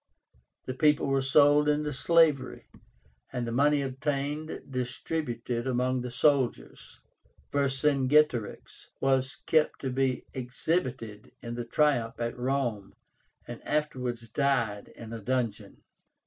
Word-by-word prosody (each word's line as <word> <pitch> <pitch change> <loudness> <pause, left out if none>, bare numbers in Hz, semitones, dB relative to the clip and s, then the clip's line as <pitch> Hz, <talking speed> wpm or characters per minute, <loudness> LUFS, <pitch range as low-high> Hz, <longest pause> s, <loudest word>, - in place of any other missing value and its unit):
The 130 - -3
people 150 +2 +3
were 135 -1 +1
sold 145 +2 +5
into 150 0 0
slavery, 150 -2 +2 0.7
and 125 -1 -3
the 115 - -4
money 145 +3 +3
obtained 145 +3 -3
distributed 125 -2 -3
among 130 0 0
the 125 - -5
soldiers. 130 +1 0 0.5
Vercingetorix 140 -3 +1
was 135 0 +1
kept 155 -1 +2
to 130 - -2
be 130 -1 0
exhibited 125 - -3
in 120 0 -5
the 120 0 -4
triumph 120 -3 +1
at 115 0 -2
Rome, 125 -5 -2 0.5
and - - -8
afterwards 125 -6 -2
died 115 -5 0
in 115 -1 -9
a 115 - -5
dungeon. 110 -3 -3
130 Hz, 115 wpm, -28 LUFS, 120-145 Hz, 0.7 s, sold